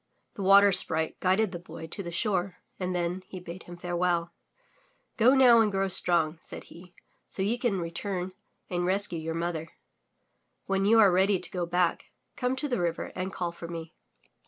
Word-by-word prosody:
The - - -7
Water 200 +1 +6
Sprite 160 -3 0
guided 190 +2 +2
the 175 - -6
Boy 165 -1 -10
to 165 +5 -7
the 175 -3 -6
shore 185 0 -1 0.2
and 180 -1 -2
then 175 +1 -2
he 185 - -8
bade 175 0 -9
him 175 0 -10
farewell. 175 -1 -1 0.8
Go 250 +3 +5
now 245 -4 +7
and 215 -2 +2
grow 195 0 0
strong,'* 170 -3 +4
said - - -8
he, 175 +1 -15 0.3
so 190 - -4
you 230 +5 0
can 240 -6 0
return 180 +2 -4 0.4
and 175 -1 -2
rescue 185 -1 0
your 160 +1 -4
mother. 165 -1 -3 1.0
When 195 0 0
you 225 +3 +5
are 205 -4 +7
ready 190 +2 +3
to - - -5
go 175 -2 -3
back, 175 0 0 0.3
come 250 0 -1
to 295 +3 -2
the 245 -9 -1
river 170 -1 -2
and 185 +1 -4
call 175 -2 -3
for 170 0 -9
me." 165 -1 -7
180 Hz, 185 wpm, -28 LUFS, 170-200 Hz, 1.0 s, now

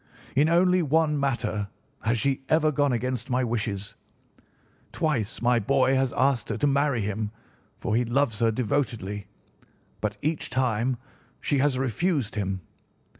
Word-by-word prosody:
In 145 +4 +4
only 180 +2 +4
one 155 -1 +2
matter 120 -6 -1 0.3
has 115 +1 +1
she 135 +3 0
ever 155 -1 +4
gone 145 -1 +2
against 125 +1 -2
my 130 0 +1
wishes. 105 -4 -2 1.0
Twice 135 - -1
my 120 0 +4
boy 130 +4 +3
has 135 -1 +2
asked 130 -3 +1
her - - -1
to - - +1
marry 140 -3 +2
him, 105 +1 -2 0.5
for 105 - -1
he 120 - +3
loves 120 -2 +1
her 115 - +4
devotedly, 110 -4 -1 0.7
but 105 0 -2
each 155 +1 -1
time 125 -1 +1 0.4
she 140 - 0
has 135 -1 +2
refused 135 - 0
him. 95 -2 -2
130 Hz, 145 wpm, -26 LUFS, 110-145 Hz, 1.0 s, In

